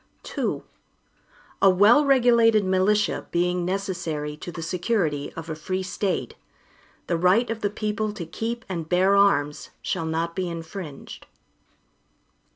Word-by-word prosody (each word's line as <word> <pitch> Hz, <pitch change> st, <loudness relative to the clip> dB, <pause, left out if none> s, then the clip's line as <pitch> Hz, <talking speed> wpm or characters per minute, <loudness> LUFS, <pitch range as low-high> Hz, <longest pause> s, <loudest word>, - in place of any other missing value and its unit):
II -, -, -1 dB, 1.0 s
A 195 Hz, -, +7 dB
well 205 Hz, +10 st, +6 dB
regulated 235 Hz, -6 st, +4 dB
militia, 190 Hz, +3 st, +1 dB
being 180 Hz, +1 st, 0 dB
necessary 175 Hz, -6 st, -3 dB
to 165 Hz, +3 st, -8 dB
the 165 Hz, -1 st, -6 dB
security 170 Hz, -5 st, -1 dB
of 165 Hz, -1 st, -7 dB
a 160 Hz, -, -3 dB
free 185 Hz, +5 st, -3 dB
State, 190 Hz, +1 st, -2 dB, 0.7 s
the 170 Hz, -2 st, -1 dB
right 190 Hz, +8 st, +4 dB
of 225 Hz, -1 st, -4 dB
the 205 Hz, -, +1 dB
people 210 Hz, +1 st, -2 dB
to 180 Hz, -5 st, -6 dB
keep 230 Hz, +8 st, -4 dB
and 165 Hz, -4 st, -5 dB
bear 185 Hz, +2 st, +4 dB
arms, 150 Hz, -7 st, +2 dB
shall 165 Hz, -, -2 dB
not 165 Hz, +1 st, -2 dB
be 185 Hz, -2 st, -2 dB
infringed. 165 Hz, -2 st, -8 dB
185 Hz, 135 wpm, -24 LUFS, 165-210 Hz, 1.0 s, A